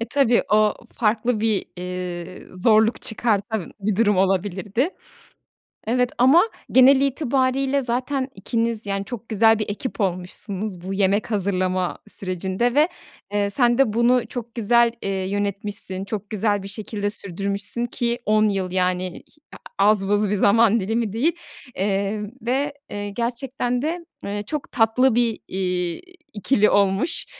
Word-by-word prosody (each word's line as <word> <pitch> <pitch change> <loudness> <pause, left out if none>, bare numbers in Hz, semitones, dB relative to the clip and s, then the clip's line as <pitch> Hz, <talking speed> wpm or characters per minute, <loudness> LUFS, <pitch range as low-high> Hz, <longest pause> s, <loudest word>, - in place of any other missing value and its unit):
E, 230 - -2
tabii, 270 -5 +3
o 215 0 +4 0.2
farklı 220 0 +1
bir, 220 -3 +1
iii, 180 0 -6
zorluk 220 +3 +3
çıkartan 220 -3 -1
bir 200 -1 0
durum 210 -3 +3
olabilirdi. 195 - 0 1.0
Evet 250 +1 +1
ama 270 - +6 0.3
genel 265 +1 +7
itibariyle 270 0 +1
zaten 260 +2 -1
ikiniz, 230 -2 -2
yani, 195 0 -2
çok 235 -2 -8
güzel 220 +1 +4
bir 215 - -2
ekip 220 +2 -4
olmuşsunuz 185 +1 -3
bu 190 +2 -5
yemek 200 +3 +1
hazırlama 185 -2 0
sürecinde 190 +5 -2
ve, 305 +4 +4 0.4
eee, 205 -1 +1
sen 240 +2 +3
de 250 -6 +3
bunu 240 +1 +3
çok 235 -1 -7
güzel, 235 +1 +4
eee, 195 - -3 0.2
yönetmişsin. 200 -1 -3
Çok 210 -1 -5
güzel 205 -2 0
bir - - -6
şekilde 205 0 -3
sürdürmüşsün 200 +4 -4
ki 240 0 -2
10 215 0 +3
yıl, 190 -2 -2
yani, 185 -1 -1 0.3
h - - -9 0.2
a 200 +1 +5
az 195 -2 +2
buz 205 0 +2
bir 210 - +1
zaman 225 +2 +4
dilimi 220 +1 -1
değil! 310 +10 +1 0.4
Emm, 200 +2 -1
ve, 270 +5 -1 0.2
eee, 205 0 -4
gerçekten 245 +2 -2
de, 335 +3 -3 0.2
ııı, 205 +1 -3
çok 300 +6 -5
tatlı 235 +2 +3
bir, 235 -3 +1
iii, 180 -2 -2 0.3
ikili 210 0 +2
olmuş. 200 - +1
215 Hz, 140 wpm, -22 LUFS, 195-240 Hz, 1.0 s, genel